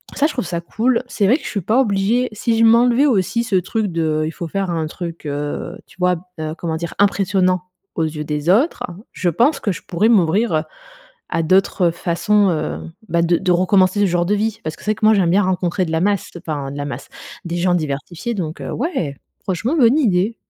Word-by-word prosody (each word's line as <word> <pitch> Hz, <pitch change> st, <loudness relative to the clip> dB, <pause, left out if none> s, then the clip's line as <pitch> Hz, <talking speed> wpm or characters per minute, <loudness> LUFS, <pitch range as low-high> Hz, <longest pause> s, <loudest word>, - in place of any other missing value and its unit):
ça 285 Hz, -, +2 dB
je -, -, -5 dB
trouve 250 Hz, -, -2 dB
ça 170 Hz, 0 st, -3 dB
cool, 230 Hz, +8 st, 0 dB
c'est 210 Hz, -4 st, 0 dB
vrai 250 Hz, +7 st, +4 dB
que -, -, -15 dB
je -, -, -5 dB
suis 200 Hz, -, -2 dB
pas 220 Hz, +8 st, +2 dB
obligée 220 Hz, +1 st, +2 dB
si 225 Hz, +2 st, 0 dB
je 230 Hz, -, +5 dB
m'enlevais 240 Hz, +4 st, +5 dB
aussi 235 Hz, -2 st, +1 dB
ce 225 Hz, -4 st, -1 dB
truc 205 Hz, +4 st, 0 dB
de 160 Hz, -2 st, 0 dB
il 155 Hz, -, -3 dB
faut 170 Hz, +1 st, -6 dB
faire 195 Hz, +3 st, -2 dB
un 165 Hz, -2 st, -1 dB
truc, 170 Hz, 0 st, -7 dB
heu, 145 Hz, +5 st, -4 dB
tu -, -, -21 dB
vois? 180 Hz, 0 st, +3 dB, 0.2 s
Heu, 155 Hz, 0 st, -3 dB
comment 165 Hz, -1 st, -3 dB
dire? 170 Hz, 0 st, -5 dB
Impressionnant 190 Hz, -2 st, +2 dB, 0.3 s
aux 165 Hz, -, 0 dB
yeux 155 Hz, -1 st, -3 dB
des 150 Hz, +1 st, -3 dB
autres, 245 Hz, -, +3 dB, 0.3 s
je 180 Hz, -, 0 dB
pense 250 Hz, -, +2 dB
que 205 Hz, -, -1 dB
je 180 Hz, -, -6 dB
pourrais 195 Hz, +5 st, +1 dB
m'ouvrir, 205 Hz, 0 st, +3 dB
heu, 155 Hz, 0 st, +1 dB, 0.7 s
à 165 Hz, -, 0 dB
d'autres 185 Hz, 0 st, +3 dB
façons, 175 Hz, +4 st, +1 dB
heu, 160 Hz, -3 st, -2 dB, 0.3 s
bah, 170 Hz, +1 st, +2 dB
de 170 Hz, 0 st, +2 dB
de 185 Hz, 0 st, 0 dB
recommencer 185 Hz, +2 st, +3 dB
ce 205 Hz, -, +4 dB
genre 175 Hz, -2 st, +1 dB
de 205 Hz, +4 st, +1 dB
vie. 220 Hz, +1 st, -1 dB
Parce 155 Hz, 0 st, -4 dB
que -, -, -17 dB
c'est 210 Hz, -, +1 dB
vrai -, -, -1 dB
que 215 Hz, -, -1 dB
moi 220 Hz, -, +6 dB
j'aime 185 Hz, -4 st, +2 dB
bien 195 Hz, +4 st, +3 dB
rencontrer 185 Hz, 0 st, 0 dB
de 160 Hz, -, -5 dB
la 160 Hz, 0 st, 0 dB
masse, 200 Hz, 0 st, 0 dB
enfin, 150 Hz, -5 st, -4 dB
de 140 Hz, -, -7 dB
la 145 Hz, -, -3 dB
masse, 145 Hz, -, -7 dB, 0.4 s
des 170 Hz, 0 st, -3 dB
gens 175 Hz, 0 st, +2 dB
diversifiés 165 Hz, -, -3 dB
donc, 170 Hz, -6 st, -4 dB
heu, -, -, -5 dB
ouais! 225 Hz, -, -2 dB, 0.3 s
Franchement 220 Hz, -, -1 dB
bonne 250 Hz, 0 st, +5 dB
idée. 210 Hz, -3 st, +1 dB
185 Hz, 230 wpm, -19 LUFS, 165-215 Hz, 0.7 s, moi